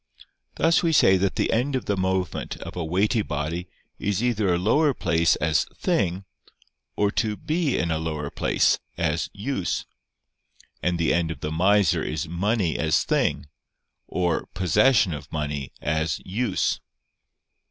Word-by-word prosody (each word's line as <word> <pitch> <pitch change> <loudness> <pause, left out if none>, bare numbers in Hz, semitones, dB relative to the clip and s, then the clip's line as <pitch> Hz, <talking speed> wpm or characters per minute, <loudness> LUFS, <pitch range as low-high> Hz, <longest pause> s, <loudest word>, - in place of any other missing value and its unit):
Thus 165 +1 +3
we 165 -2 +1
say 95 -9 +6
that 95 +1 0
the - - 0
end 130 +5 +1
of 130 - -2
the 100 - 0
movement 95 -1 -2
of - - -8
a 90 - -2
weighty 100 +7 +1
body 80 +1 -3 0.3
is 105 +2 -1
either 110 -6 +1
a 85 - +2
lower 140 - +2
place 85 -1 +2
as 80 +1 +1
"thing," 95 +1 0 0.7
or 105 -1 +1
to 110 -1 -1
be 155 -2 0
in 85 -1 0
a 80 - 0
lower 75 -3 -3
place, - - +2 0.2
as 85 -1 0
"use"; 100 - -2 1.0
and 90 -1 0
the 85 -1 +2
end 85 -1 +1
of 80 - -6
the 75 - -3
miser 95 +2 +3
is 80 +1 -3
money 90 0 0
as - - +2
"thing," - - 0 0.6
or 90 -2 -1
possession 95 - +3
of 75 - -8
money 75 -3 -3
as 80 +1 0
"use." 115 +7 0
90 Hz, 150 wpm, -24 LUFS, 80-105 Hz, 1.0 s, say